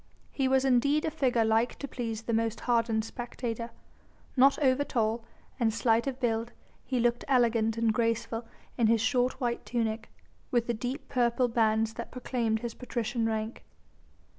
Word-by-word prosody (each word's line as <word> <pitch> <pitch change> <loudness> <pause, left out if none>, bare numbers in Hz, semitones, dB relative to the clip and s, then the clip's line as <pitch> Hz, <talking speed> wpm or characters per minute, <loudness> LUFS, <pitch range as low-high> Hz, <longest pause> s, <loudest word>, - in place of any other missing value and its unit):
He 270 -2 0
was 265 0 +3
indeed 275 +4 +3
a 320 - -1
figure 250 -7 +2
like 225 +2 +2
to 280 - -5
please 225 -4 -4
the 230 - -2
most 225 0 0
hardened 230 -2 +1
spectator. 235 -1 -5 0.7
Not 270 +1 +5
over 275 -1 +3
tall, 230 -4 0 0.4
and 230 -2 +3
slight 225 +2 +2
of 265 -1 -3
build, 230 -2 -1 0.3
he 255 -1 -1
looked 240 0 +1
elegant 230 -4 +2
and 230 -1 +2
graceful 230 0 -1 0.3
in 230 - +4
his 230 0 +4
short 250 +3 +1
white 240 -3 -1
tunic, 225 -2 -2 0.4
with 240 -2 +1
the 240 - -1
deep 250 +6 -4
purple 245 0 +2
bands 225 -1 +2
that - - -6
proclaimed 235 -3 -1
his 235 -1 -4
patrician 235 -2 -2
rank. 220 +1 -3
235 Hz, 165 wpm, -29 LUFS, 225-250 Hz, 0.7 s, Not